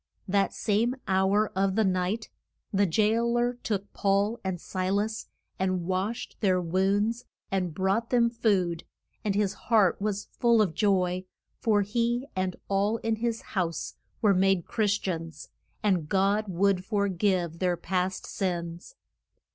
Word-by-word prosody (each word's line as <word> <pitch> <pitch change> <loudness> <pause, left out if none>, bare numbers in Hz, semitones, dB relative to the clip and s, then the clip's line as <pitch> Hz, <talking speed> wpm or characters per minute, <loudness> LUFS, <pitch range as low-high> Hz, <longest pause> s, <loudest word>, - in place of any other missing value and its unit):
That 195 +1 +2
same 230 +4 +1
hour 195 +3 +2
of 195 0 +1
the 220 - +3
night 190 +3 0 0.4
the 200 0 +3
jail 225 +6 +2
er 240 0 0
took 200 -3 -3
Paul 200 +3 +1
and 190 -2 -2
Si 185 +1 -3
las 210 +3 -1 0.3
and 185 -2 0
washed 190 +5 -2
their 185 -3 +2
wounds, 200 +7 0 0.3
and 185 -3 0
brought 195 +7 0
them 240 -2 +4
food, 195 -8 +1 0.4
and 205 -3 0
his 205 -2 +1 0.2
heart 210 -5 +4
was 210 -1 -1
full 235 -1 +4
of 200 -7 +2
joy, 185 -1 +1 0.3
for 210 -4 +3
he 235 +4 0
and 185 -1 -1
all 200 +3 +1
in 225 -1 0
his 230 0 -1
house 170 -5 -2 0.3
were 205 -2 +5
made 190 -2 +2
Chris 205 -3 +1
tians, 165 -5 -5 0.3
and 180 -7 +1
God 200 +2 +2
would 190 0 +1
for 200 0 0
give 180 -3 0
their 180 -2 +1
past 185 +1 -2
sins. 170 -3 -4
195 Hz, 145 wpm, -28 LUFS, 185-215 Hz, 0.4 s, were